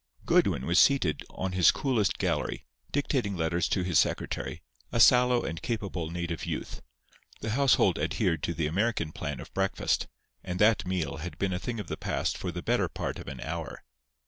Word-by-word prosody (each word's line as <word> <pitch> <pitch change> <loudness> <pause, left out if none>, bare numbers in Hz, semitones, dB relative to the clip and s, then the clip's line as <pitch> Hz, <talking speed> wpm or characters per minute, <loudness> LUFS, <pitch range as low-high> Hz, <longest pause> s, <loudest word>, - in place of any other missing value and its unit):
Goodwin 65 - +3
was 85 +2 +4
seated 130 - +4
on 95 0 -4
his 90 -2 +5
coolest 120 -8 +1
gallery, - - -1 0.3
dictating 130 -8 0
letters 85 +1 0
to 95 - +1
his 90 -4 +3
secretary, - - -1 0.3
a 115 - 0
sallow 125 +1 +6
and 80 0 -4
capable 100 -8 -3
native 85 -1 -4
youth. - - -5 0.6
The 110 - -2
household 135 +2 +3
adhered 80 -3 0
to 85 - -2
the 80 0 0
American 90 0 0
plan 75 -3 -5
of - - -10
breakfast; 95 0 0 0.4
and 90 -1 -4
that 105 -1 +3
meal 90 -3 -2
had 85 +3 -7
been 95 -1 0
a 90 - -2
thing 115 +2 -4
of 105 - -4
the - - -5
past - - -1
for 90 - -4
the 85 0 -6
better - - +1
part - - -4
of - - -10
an 65 -2 -7
hour. - - -5
90 Hz, 185 wpm, -29 LUFS, 85-110 Hz, 0.6 s, sallow